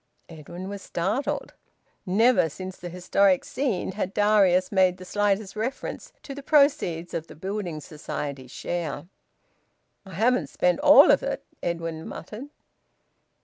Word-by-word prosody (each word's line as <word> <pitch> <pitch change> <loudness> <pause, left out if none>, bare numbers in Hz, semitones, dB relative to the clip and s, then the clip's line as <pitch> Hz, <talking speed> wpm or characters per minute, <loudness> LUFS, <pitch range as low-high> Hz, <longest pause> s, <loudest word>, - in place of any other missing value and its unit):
Edwin 170 +3 -9
was 200 0 -6
startled. 195 +13 -2 0.5
Never 215 -1 +4
since 185 +4 -8
the 175 - -8
historic 180 +1 +2
scene 250 -10 -2
had 190 0 -4
Darius 195 -3 +3
made 185 -2 +3
the 185 - -11
slightest 205 +1 0
reference 230 +5 -4
to 275 - -7
the 285 - -8
proceeds 280 - +2
of 165 0 -4
the - - -12
Building 185 -1 -4
Society 145 -3 -6
share. 160 +2 -4 1.0
"I 190 -3 -11
haven't 225 - +2
spent 180 +5 +1
all 295 0 +8
of - - +4
it," - - -4 0.2
Edwin 165 -2 -4
muttered. 215 +9 -8
185 Hz, 135 wpm, -25 LUFS, 170-215 Hz, 1.0 s, all